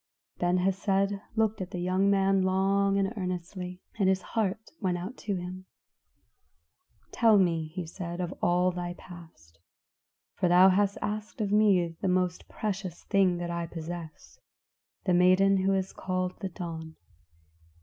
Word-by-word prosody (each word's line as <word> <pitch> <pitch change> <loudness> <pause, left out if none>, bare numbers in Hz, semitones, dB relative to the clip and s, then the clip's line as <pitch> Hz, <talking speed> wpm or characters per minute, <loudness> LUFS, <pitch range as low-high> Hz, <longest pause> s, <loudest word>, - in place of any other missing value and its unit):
Ben 175 +1 +2
Hesed 195 +2 +1 0.2
looked 220 -2 +1
at 180 - -4
the 180 - -6
young 185 +2 +2
man 195 -1 +3
long 195 +1 +2
and 195 +2 0
earnestly, 180 -1 -5 0.2
and 190 -2 +4
his 190 -1 +1
heart 220 -1 -1
went 185 -4 0
out 185 +8 -6
to 205 -2 -3
him. 185 +1 -7 1.4
"Tell 225 -3 +5
me," 165 -4 +2
he 175 +2 -6
said, 170 +1 -6 0.2
"all 180 +1 +3
of - - -4
thy 175 0 -4
past; 165 - -14 0.7
for 180 - 0
thou 180 +2 +7
hast 200 +1 +2
asked 215 +2 -4
of 205 -2 -1
me 200 -5 +4
the - - 0
most 180 -1 0
precious 195 -5 -4
thing 190 -3 +2
that 175 0 -4
I 170 0 -3
possess, 165 -1 -8 0.6
the 180 - +1
maiden 185 +2 +5
who 190 +1 +2
is 190 0 -2
called 185 -1 -2
the 195 - -3
Dawn. 160 -2 -7
185 Hz, 150 wpm, -28 LUFS, 175-195 Hz, 1.4 s, thou